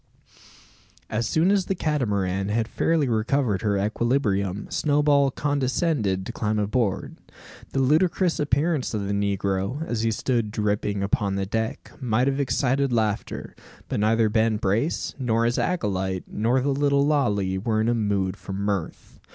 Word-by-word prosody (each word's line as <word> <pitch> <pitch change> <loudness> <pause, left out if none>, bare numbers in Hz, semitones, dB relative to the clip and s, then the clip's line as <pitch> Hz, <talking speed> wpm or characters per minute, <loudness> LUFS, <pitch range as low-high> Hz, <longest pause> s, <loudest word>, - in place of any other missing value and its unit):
As 110 +1 0
soon 165 +4 +2
as 200 -2 +2
the 195 - 0
Catamaran 100 - -1
had 110 +1 0
fairly 160 +1 +1
recovered 115 -2 +1
her 100 -2 +1
equilibrium, 105 -2 0
Snowball 145 -2 +3
condescended 135 - 0
to - - -4
climb 105 0 -1
aboard. 105 0 -1 0.6
The 135 - +1
ludicrous 165 +5 +2
appearance 145 -2 0
of 100 -2 -2
the 100 - -2
negro, 100 - -1
as 120 -6 -2
he 115 - +1
stood 115 0 0
dripping 105 -1 -1
upon 100 0 0
the 100 0 -1
deck, 110 +3 -3
might 125 0 +1
have 135 0 0
excited 135 0 +1
laughter; 110 -3 -2 0.3
but - - -1
neither 110 +1 +3
Ben 110 0 +2
Brace, 110 - -1
nor 115 -3 +1
his 120 +1 +1
acolyte, 95 - -1
nor 120 +5 +1
the 140 - 0
little 140 0 +2
Lalee, 105 -11 +1
were 110 -2 +1
in 110 - +1
a 120 - +3
mood 100 -4 0
for 95 - -8
mirth. 100 -3 -4
115 Hz, 150 wpm, -24 LUFS, 100-140 Hz, 0.6 s, Snowball